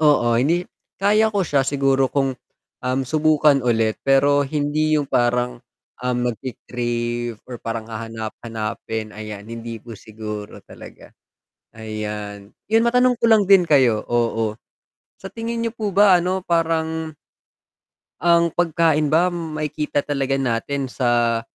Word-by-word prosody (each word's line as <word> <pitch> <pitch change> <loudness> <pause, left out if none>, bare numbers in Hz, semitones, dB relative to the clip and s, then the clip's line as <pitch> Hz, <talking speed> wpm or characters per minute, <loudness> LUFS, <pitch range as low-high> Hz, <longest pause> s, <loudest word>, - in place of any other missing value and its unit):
Oo 145 -6 +4
hindi 170 +7 +1 0.3
kaya 210 +3 +3
ko 205 -3 0
siya 145 -4 +2
siguro 135 -1 +1
kung, 135 -1 0 0.5
um, 130 +1 -1
subukan 150 0 +3
ulit 115 -3 0
pero 140 +1 +3
hindi 155 +1 +1
'yong 145 - 0
parang, 125 -1 0 0.4
ah, 125 0 -1
magki-crave 120 -1 -3
or 125 -2 -9
parang 115 -1 -4
hahanap-hanapin 110 -1 -5
ayan 105 -1 -8
hindi 115 +1 -7
po 115 +1 -11
siguro 105 -1 -8
talaga. - - -14 0.6
Ayan, 105 -2 -6 0.2
'yon 225 +1 +4
matanong 250 0 +3
ko 230 - +3
lang 220 -2 +5
din 190 -3 +5
kayo, 130 -7 +4
oo 115 -2 0 0.6
sa 195 - -10
tingin 230 +1 -4
niyo 230 - -2
po 220 -3 -3
ba 195 -2 +5
ano 185 +1 -2
parang, 160 -2 -1 1.0
ang 170 0 +3
pagkain 160 -3 +1
ba 175 +3 +4
makikita 155 -3 -3
talaga 140 -2 -1
natin 130 +2 -2
sa 120 -2 +1
135 Hz, 130 wpm, -21 LUFS, 115-165 Hz, 1.0 s, lang